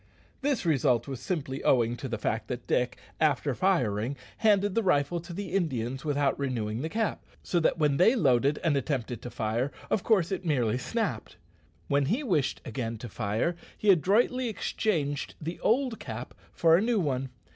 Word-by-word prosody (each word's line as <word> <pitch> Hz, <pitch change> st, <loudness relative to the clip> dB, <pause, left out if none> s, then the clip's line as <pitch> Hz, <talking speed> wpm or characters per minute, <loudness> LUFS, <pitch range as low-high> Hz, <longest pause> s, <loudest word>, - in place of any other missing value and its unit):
This 275 Hz, -7 st, 0 dB
result 135 Hz, -6 st, +2 dB
was 135 Hz, -3 st, -5 dB
simply 140 Hz, -7 st, -3 dB
owing 120 Hz, -2 st, +3 dB
to 135 Hz, -, -5 dB
the 115 Hz, -, -2 dB
fact 110 Hz, +1 st, -2 dB
that 125 Hz, -1 st, -5 dB
Dick, 125 Hz, 0 st, 0 dB, 0.2 s
after 145 Hz, -2 st, +2 dB
firing, 125 Hz, -, +1 dB, 0.2 s
handed 205 Hz, -2 st, +3 dB
the 230 Hz, -, +2 dB
rifle 170 Hz, -3 st, +2 dB
to 170 Hz, +2 st, -10 dB
the 190 Hz, +2 st, -5 dB
Indians 135 Hz, -8 st, -1 dB
without 145 Hz, -2 st, +1 dB
renewing 115 Hz, -5 st, -2 dB
the 160 Hz, -, -3 dB
cap; 220 Hz, +3 st, -1 dB, 0.2 s
so 175 Hz, -, +1 dB
that 160 Hz, -, +2 dB
when 150 Hz, -3 st, +2 dB
they 220 Hz, +8 st, +5 dB
loaded 140 Hz, -, +3 dB
and 160 Hz, -4 st, +2 dB
attempted 130 Hz, -4 st, -2 dB
to 125 Hz, -, -6 dB
fire, 115 Hz, +4 st, -1 dB, 0.2 s
of 205 Hz, -, +2 dB
course 195 Hz, -6 st, +2 dB
it 190 Hz, -, -2 dB
merely 125 Hz, -8 st, +1 dB
snapped. 130 Hz, -, -3 dB, 0.5 s
When 140 Hz, 0 st, +2 dB
he 240 Hz, -, 0 dB
wished 160 Hz, -, 0 dB
again 115 Hz, -3 st, -4 dB
to 120 Hz, +2 st, -8 dB
fire, 110 Hz, -, -1 dB, 0.2 s
he 210 Hz, -, +5 dB
adroitly 230 Hz, -, +2 dB
exchanged 160 Hz, -8 st, -1 dB
the 165 Hz, +3 st, -5 dB
old 245 Hz, 0 st, +1 dB
cap -, -, -7 dB, 0.2 s
for 165 Hz, -1 st, +4 dB
a 175 Hz, -, +3 dB
new 230 Hz, 0 st, +2 dB
one. 135 Hz, -5 st, -1 dB
145 Hz, 180 wpm, -28 LUFS, 125-190 Hz, 0.5 s, they